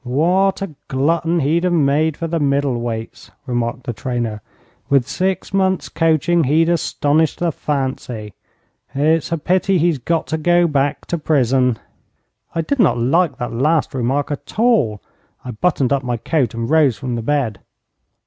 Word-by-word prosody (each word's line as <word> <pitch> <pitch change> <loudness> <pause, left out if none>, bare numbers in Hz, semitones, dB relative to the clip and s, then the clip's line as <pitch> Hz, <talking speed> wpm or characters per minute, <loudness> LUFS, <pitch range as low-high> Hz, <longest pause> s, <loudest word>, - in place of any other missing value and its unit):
'What 180 +10 +1
a 190 -6 -6
glutton 165 +5 +1
he'd 160 +5 +1
have 180 -1 +1
made 155 0 +2
for 165 - -3
the 165 0 -1
middle 140 -4 0
weights,' 115 -1 -6 0.2
remarked 120 -1 -2
the 120 - -4
trainer; 115 -2 -3 0.5
'with 135 -3 +3
six 190 +1 -2
months' 190 -1 +1
coaching 165 0 +2
he'd 160 +5 +3
astonish 160 -2 +1
the 175 -1 -1
fancy. 130 - -4 0.6
It's 155 +3 +1
a 165 - +1
pity 185 +4 +1
he's 165 -3 +1
got 165 +6 -1
to 160 - 0
go 175 +2 +3
back 145 -2 0
to 170 - -3
prison.' 130 -5 +2 0.8
I 165 - +1
did 270 - -2
not 190 - +4
like 135 +4 +1
that 120 -3 -4
last 150 +6 +1
remark 135 +3 -1
at 145 - -7
all. 210 - +2 0.4
I 125 - -4
buttoned 135 +2 +1
up 140 - +1
my 125 -2 -2
coat 125 -2 -1
and 115 0 -3
rose 145 -6 +3
from 125 +3 -4
the 120 - -2
bed. 120 -6 -1
145 Hz, 165 wpm, -19 LUFS, 125-165 Hz, 0.8 s, not